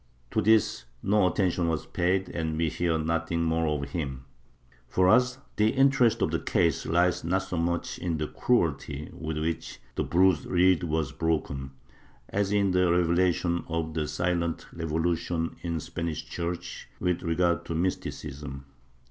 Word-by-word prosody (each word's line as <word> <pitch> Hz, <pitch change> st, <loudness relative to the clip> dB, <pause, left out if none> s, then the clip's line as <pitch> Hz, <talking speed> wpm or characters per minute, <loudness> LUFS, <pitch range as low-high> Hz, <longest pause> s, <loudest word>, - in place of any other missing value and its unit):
To -, -, +1 dB
this 110 Hz, -, +3 dB, 0.2 s
no 100 Hz, -1 st, +3 dB
attention 90 Hz, -2 st, +1 dB
was 80 Hz, -2 st, -1 dB
paid 90 Hz, +1 st, 0 dB
and 80 Hz, -2 st, -2 dB
we 80 Hz, 0 st, +1 dB
hear 85 Hz, +1 st, 0 dB
nothing 85 Hz, +1 st, -1 dB
more 80 Hz, 0 st, +1 dB
of 70 Hz, -2 st, -2 dB
him. 70 Hz, -6 st, -4 dB, 0.6 s
For 90 Hz, +8 st, +2 dB
us 125 Hz, +5 st, +4 dB, 0.2 s
the 105 Hz, +1 st, +4 dB
interest 135 Hz, -4 st, +4 dB
of -, -, +1 dB
the -, -, 0 dB
case 85 Hz, -2 st, +1 dB
lies 90 Hz, +2 st, +2 dB
not 95 Hz, +4 st, +1 dB
so 90 Hz, -, -5 dB
much 85 Hz, +1 st, -1 dB
in 85 Hz, -3 st, -1 dB
the 75 Hz, -, -1 dB
cruelty 75 Hz, -, 0 dB
with 80 Hz, -1 st, -4 dB
which 80 Hz, +1 st, -3 dB
the -, -, -1 dB
bruised 90 Hz, -3 st, +3 dB
reed 90 Hz, 0 st, +4 dB
was 80 Hz, -3 st, -1 dB
broken, 70 Hz, -5 st, -2 dB, 0.6 s
as 100 Hz, 0 st, 0 dB
in 100 Hz, -2 st, +3 dB
the 90 Hz, -1 st, +3 dB
revelation 85 Hz, 0 st, +2 dB
of 80 Hz, -1 st, -2 dB
the 75 Hz, -1 st, -1 dB
silent 85 Hz, -1 st, -1 dB
revolution 80 Hz, 0 st, -1 dB
in 85 Hz, -1 st, -2 dB
the 80 Hz, -, -2 dB
Spanish 85 Hz, -1 st, -4 dB
Church 85 Hz, 0 st, -5 dB
with 90 Hz, -1 st, 0 dB
regard 85 Hz, 0 st, +1 dB
to 85 Hz, -, -4 dB
mysti 90 Hz, +3 st, 0 dB
cism. 70 Hz, -2 st, -7 dB
85 Hz, 160 wpm, -28 LUFS, 80-90 Hz, 0.6 s, us